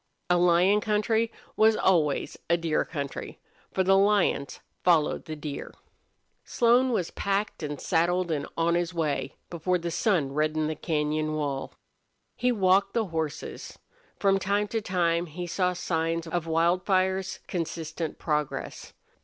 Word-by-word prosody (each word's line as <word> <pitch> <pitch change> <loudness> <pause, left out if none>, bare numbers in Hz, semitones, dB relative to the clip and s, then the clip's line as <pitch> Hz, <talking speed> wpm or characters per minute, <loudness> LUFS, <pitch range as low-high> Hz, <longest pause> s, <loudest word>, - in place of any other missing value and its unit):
A 175 - +5
lion 180 +4 +4
country 220 +2 +1 0.2
was 220 0 +5
always 160 -9 +1
a 170 - +4
deer 165 -2 0
country, 140 -4 -6 0.3
for 190 - +1
the 195 +1 +4
lions 195 -8 +2 0.2
followed 165 -4 +3
the 155 - -5
deer. 150 -1 -6 0.7
Slone 245 +2 +3
was 185 -8 -1
packed 200 0 -2
and 150 -2 -4
saddled 175 0 +1
and 145 -2 -2
on 165 +1 +2
his 175 0 -1
way 155 -3 -1 0.2
before 175 +2 0
the 170 0 -4
sun 165 -7 +1
reddened 155 +1 0
the - - -4
cañon 155 -1 -1
wall. 140 -3 -3 0.6
He 250 0 +1
walked 195 -2 +3
the 230 -2 +2
horses. 160 -2 -4 0.4
From 195 -1 +3
time 200 +2 0
to 225 0 -1
time 175 -3 0
he 175 +3 -6
saw 180 +1 0
signs 165 -1 -1
of 165 0 -3
Wildfire's 185 +3 +1
consistent 165 -2 -4
progress. 150 -3 -3
175 Hz, 140 wpm, -27 LUFS, 155-195 Hz, 0.7 s, A